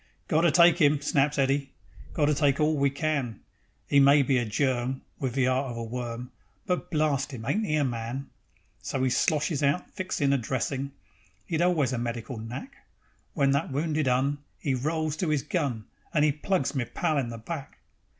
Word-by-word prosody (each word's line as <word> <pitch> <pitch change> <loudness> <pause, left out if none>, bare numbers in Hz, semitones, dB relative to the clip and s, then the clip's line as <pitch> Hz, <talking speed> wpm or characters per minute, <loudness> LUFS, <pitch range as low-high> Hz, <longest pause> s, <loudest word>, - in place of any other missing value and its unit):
"Got 155 - +3
to 170 -2 +4
take 170 +1 +6
'im," 145 -1 +5
snaps 145 +1 +1
Eddy; 135 0 +1 0.4
"Got 150 - +3
to 150 - +3
take 140 -2 +2
all 155 +1 +3
we 140 -1 +2
can. 140 -6 -2 0.5
'E 140 - +6
may 140 +1 +6
be 130 -1 +2
a 120 - -1
Germ 130 +2 -1 0.2
Wiv 130 -3 -2
the 135 -1 +2
'eart 130 +1 +1
of 120 - -6
a 115 - -3
worm, 120 +1 -5 0.3
But, 180 0 -1
blarst 145 -3 0
'im! 110 -2 -8
ain't 215 - 0
'e 155 - +1
a 150 - +2
man?" 120 +2 -4 0.5
So 130 -1 -1
'e 130 - +1
sloshes 150 +2 +1
out 145 +4 0
fixin' 185 -8 0
a 140 - +2
dressin' 135 +3 -2 0.5
('E'd 165 -1 0
always 160 -8 +2
a 120 - -1
medical 120 0 -4
knack), 125 - -7 0.6
When 140 -3 +3
that 140 +2 0
wounded 150 +1 0
'Un 135 +3 +1 0.2
'E 140 - +1
rolls 155 +3 -1
to 165 -2 0
'is 150 -3 +1
gun, 125 -7 -2 0.3
And 150 -1 +4
'e 150 - +4
plugs 150 -1 -1
me 130 -4 -1
pal 155 +3 0
in 125 -4 -2
the 115 - -6
back. 140 +5 -7
140 Hz, 195 wpm, -27 LUFS, 130-155 Hz, 0.6 s, take